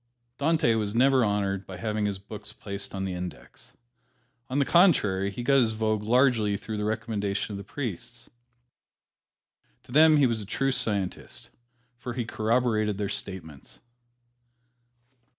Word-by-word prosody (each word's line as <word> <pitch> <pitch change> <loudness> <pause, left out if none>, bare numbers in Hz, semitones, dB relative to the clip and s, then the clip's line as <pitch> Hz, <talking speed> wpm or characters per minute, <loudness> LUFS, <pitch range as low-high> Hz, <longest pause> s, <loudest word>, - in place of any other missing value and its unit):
Dante 155 -4 +2
was 105 -1 -2
never 130 +1 +4
honored 100 -2 -1
by 95 - -8
having 105 +2 -1
his 100 -1 -3
books 105 +2 -8
placed 100 -2 -6
on 95 0 -3
the 95 - -3
"Index." 90 -1 -8 0.8
On 130 - -2
the 140 - +3
contrary, 105 - +3
he 110 +5 -6
got 135 +2 +4
his 110 -2 +1
vogue 110 -1 0
largely 115 -3 +2
through 110 +1 -6
the 105 - -2
recommendation 105 -2 -2
of - - -4
the - - -7
priests. 115 +1 -6 1.6
To - - -16
them 155 +3 +6
he 145 - +5
was 115 -3 0
a - - -7
true 135 +5 0
scientist, 100 -7 -1 0.5
for 125 -1 -5
he 120 -1 -3
corroborated 110 -2 0
their 100 -1 -2
statements. 80 -7 -6
110 Hz, 150 wpm, -27 LUFS, 100-125 Hz, 1.6 s, them